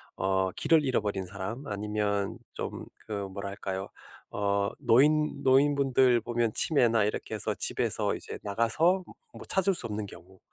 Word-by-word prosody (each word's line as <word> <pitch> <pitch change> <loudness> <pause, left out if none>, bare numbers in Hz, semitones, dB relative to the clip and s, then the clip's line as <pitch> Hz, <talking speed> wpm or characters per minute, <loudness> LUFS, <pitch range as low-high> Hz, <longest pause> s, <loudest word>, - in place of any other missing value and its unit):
어 95 0 0
길을 160 -3 +3
잃어버린 105 -7 -1
사람 100 +8 -6
아니면 105 -1 -2 0.2
좀 - - -6 0.2
그 100 -2 -3
뭐랄까요. 100 0 -5 0.4
어 100 0 0
노인 150 +4 +3
노인분들 135 -3 +4
보면 120 -1 -1
치매나 115 -8 +3
이렇게 105 - -3
해서 - - -1
집에서 - - 0
이제 - - -7
나가서 115 - +2
뭐 - - -14 0.2
뭐 - - -9
찾을 190 0 +2
수 125 - +3
없는 105 0 -4
경우. 95 0 -14
105 Hz, 295 characters per minute, -28 LUFS, 100-135 Hz, 0.4 s, 노인분들